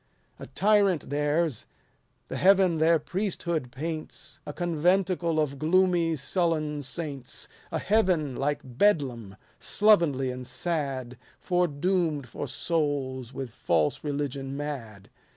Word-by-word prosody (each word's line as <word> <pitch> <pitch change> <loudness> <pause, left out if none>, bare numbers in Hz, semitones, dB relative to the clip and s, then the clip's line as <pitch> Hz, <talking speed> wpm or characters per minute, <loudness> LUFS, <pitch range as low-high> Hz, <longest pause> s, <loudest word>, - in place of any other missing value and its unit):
A - - -8
tyrant 200 -8 +2
theirs; 150 -1 0 0.6
the - - -5
heaven 185 -3 +4
their 165 +1 +5
priesthood 170 -4 -2
paints 155 +4 -6
A - - -3
conventicle 175 0 +1
of 140 -3 -1
gloomy, 170 0 +3
sullen 155 -1 0
saints; 140 -1 -5 0.2
A - - 0
heaven 185 - +1
like 145 +3 -1
Bedlam, 125 - 0 0.2
slovenly 170 -12 +3
and 125 0 -6
sad, 130 -4 -2 0.2
Foredoom'd 175 -3 0
for 145 - -5
souls 135 -4 -1
with 130 -2 -6
false 80 -7 0
religion 140 -2 -3
mad. 120 -9 -6
150 Hz, 110 wpm, -27 LUFS, 135-175 Hz, 0.6 s, their